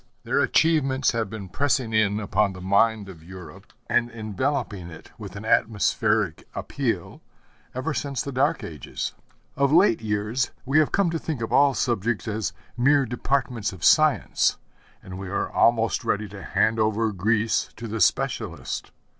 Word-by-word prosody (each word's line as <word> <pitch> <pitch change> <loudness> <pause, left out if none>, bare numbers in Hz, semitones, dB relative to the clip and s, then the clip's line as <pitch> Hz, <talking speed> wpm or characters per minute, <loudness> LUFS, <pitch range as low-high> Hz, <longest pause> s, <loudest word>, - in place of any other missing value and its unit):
Their - - 0
achievements 140 -5 +2
have 115 -3 -2
been 105 -2 -7
pressing 130 +1 0
in 105 -1 +2
upon 100 -1 +1
the 90 - -10
mind 100 +3 +2
of 90 -4 -11
Europe, 90 0 -12 0.2
and 120 -1 +1
enveloping 110 -3 -3
it 80 - -13
with 100 -3 -8
an 100 +2 -7
atmospheric 105 -3 +1
appeal, - - -3 0.5
ever 145 +5 -2
since 140 0 -2
the 140 - -5
Dark 145 +5 +1
Ages. 75 -6 -5 0.4
Of 140 0 +2
late 170 - +4
years 105 +4 -1 0.2
we 140 +4 +3
have 155 - +2
come 195 -4 +2
to 165 - -2
think 155 -5 -4
of 115 - -4
all 140 -2 +5
subjects 115 -4 -1
as 110 -1 -2 0.2
mere 140 +3 +3
departments 125 -3 -1
of 90 -4 -5
science, - - +3 0.5
and 95 0 -8
we 95 -1 -6
are 100 - -2
almost 115 -1 +2
ready 105 +1 -1
to 100 0 -10
hand 110 +3 +1
over 110 +1 +1
Greece 110 +3 0
to 115 - -7
the 110 0 -3
specialist. 80 - -1
110 Hz, 160 wpm, -24 LUFS, 100-130 Hz, 0.5 s, all